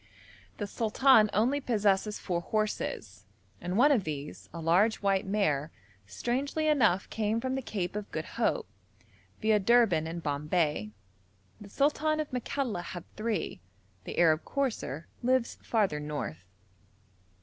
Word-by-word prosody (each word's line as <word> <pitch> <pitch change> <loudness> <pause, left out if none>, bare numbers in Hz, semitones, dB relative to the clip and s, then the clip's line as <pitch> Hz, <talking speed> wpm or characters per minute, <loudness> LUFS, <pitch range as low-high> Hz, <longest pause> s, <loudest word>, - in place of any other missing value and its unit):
The 205 - -3
sultan 220 +2 +4
only 250 +8 +2
possesses 210 -4 +1
four 175 -3 -2
horses, 110 - -3 0.3
and 180 +3 -2
one 285 +5 +6
of 240 -8 +3
these, 150 -2 -6
a 170 - -7
large 180 +7 +3
white 195 -1 +1
mare, 160 -8 +1 0.4
strangely 270 - -1
enough 215 -11 +3
came 220 +1 0
from 260 +2 -2
the 265 - -1
Cape 200 -6 -3
of 210 -1 -4
Good - - -3
Hope, 480 -3 -1 0.8
viâ 215 -2 +3
Durban 210 -8 +4
and 165 +1 -5
Bombay. 150 - 0 0.7
The 205 - -11
sultan 305 +5 +1
of 305 - -3
Makalla 250 -4 -2
had 175 0 -7
three. 215 - -2 0.4
The - - -6
'Arab 160 -2 +4
courser' 235 - -2 0.2
lives 255 -1 +1
farther 200 -10 +1
north. 145 - -5
210 Hz, 135 wpm, -30 LUFS, 165-245 Hz, 0.8 s, one